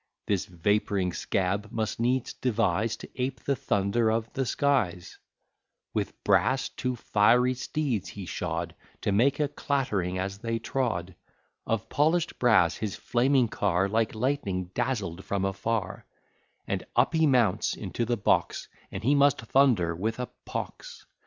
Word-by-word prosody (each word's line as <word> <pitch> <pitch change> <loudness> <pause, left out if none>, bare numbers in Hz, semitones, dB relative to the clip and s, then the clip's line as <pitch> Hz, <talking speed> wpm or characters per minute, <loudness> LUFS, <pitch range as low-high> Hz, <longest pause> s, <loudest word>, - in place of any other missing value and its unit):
This 100 -3 0
vapouring 95 +1 0
scab 100 +3 -1
must 110 -1 -2
needs 125 +2 0
devise 110 -3 0
To - - -9
ape 130 -1 -2
the 140 - 0
thunder 105 +1 +1
of 110 0 -2
the 135 -2 -1
skies: 105 -12 0 0.7
With - - -3
brass 130 0 +2
two 125 -1 -3
fiery 120 +3 +3
steeds 130 - -2
he 100 -2 -7
shod, - - -3 0.3
To - - 0
make 130 +8 +3
a 150 - +2
clattering 130 -11 -1
as 95 +1 -3
they 115 +1 -2
trod, 110 -7 -2 0.5
Of 115 0 -1
polish'd 160 +6 +1
brass 110 -9 +4
his 105 -3 -3
flaming 125 +1 +2
car 95 -3 +1
Like 110 +2 0
lightning 105 -8 -1
dazzled 105 -8 -2
from 100 -1 -1
afar; 95 0 -2 0.6
And - - -2
up - - +3
he 160 -1 +4
mounts 115 -7 +2
into 105 +4 -3
the 120 +1 0
box, 100 - +1 0.2
And 95 - -6
he 135 +5 +4
must 140 -2 +4
thunder, 115 -10 +3
with 110 +6 -2
a 125 - -3 0.2
pox. 480 -4 -6
115 Hz, 145 wpm, -28 LUFS, 95-130 Hz, 0.7 s, brass